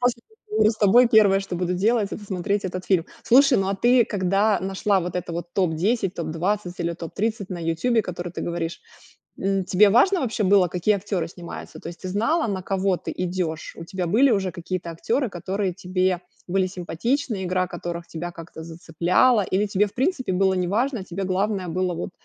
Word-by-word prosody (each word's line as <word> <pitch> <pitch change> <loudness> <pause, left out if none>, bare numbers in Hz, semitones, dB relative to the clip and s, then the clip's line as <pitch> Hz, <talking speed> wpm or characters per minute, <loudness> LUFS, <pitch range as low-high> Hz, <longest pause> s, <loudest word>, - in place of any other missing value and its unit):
После 245 -1 +1 0.2
разговора 425 - +2
с 220 - -6
тобой 225 +4 +5
первое, 205 -4 +5
что 190 -3 -5
буду 180 0 -1
делать,- 210 +2 +1
это 210 - -6
смотреть 200 +1 -2
этот 185 0 -4
фильм. 180 -3 +1 0.2
Слушай, 275 +2 +5
ну, 195 0 0
а 195 - 0
ты, 240 +3 +4
когда 200 +1 +1
нашла 195 +1 +1
вот 180 0 -4
это 175 -1 -4
вот 170 +1 -6
топ 180 -5 +1
10, 195 +3 0
топ 170 - -4
20 180 +3 -2
или 170 0 -1
топ 165 -1 -8
30 215 -1 -2
на 180 - -4
"Ютубе", 170 +8 +1
которое 175 -2 -5
ты - - -6
говоришь, 170 -1 -3 0.6
м, 195 0 0
тебе 200 +3 +5
важно 340 - +4 0.2
было, 195 -2 +5
какие 180 +4 +1
актёры 195 -4 -2
снимаются? 170 0 -9
То - - -9
есть 170 - -12
ты 185 - -5
знала, 230 - +1
на 195 -3 -2
кого 190 0 0
ты - - -6
идёшь? 175 -3 -3
У 165 - -8
тебя 180 0 -3
были 245 +9 +4
уже 190 -3 +1
какие-то 175 0 -5
актёры, 235 - -1
которые 190 +1 -3
тебе 185 -1 -1 0.3
были 190 +1 +1
симпатичны, 195 - -2
игра 185 0 0
которых 170 -1 -6
тебя 175 +2 -5
как-то 165 -1 -10
зацепляла, 170 +8 +2
или 205 +3 +2
тебе, 200 +1 +2
в 200 - -9
принципе, 260 - 0
было 190 +1 +3
неважно, 205 +6 0
тебе 190 +1 -5
главное 190 0 -1
было 180 +1 -1
вот 175 +3 -5
190 Hz, 195 wpm, -24 LUFS, 175-210 Hz, 0.6 s, тобой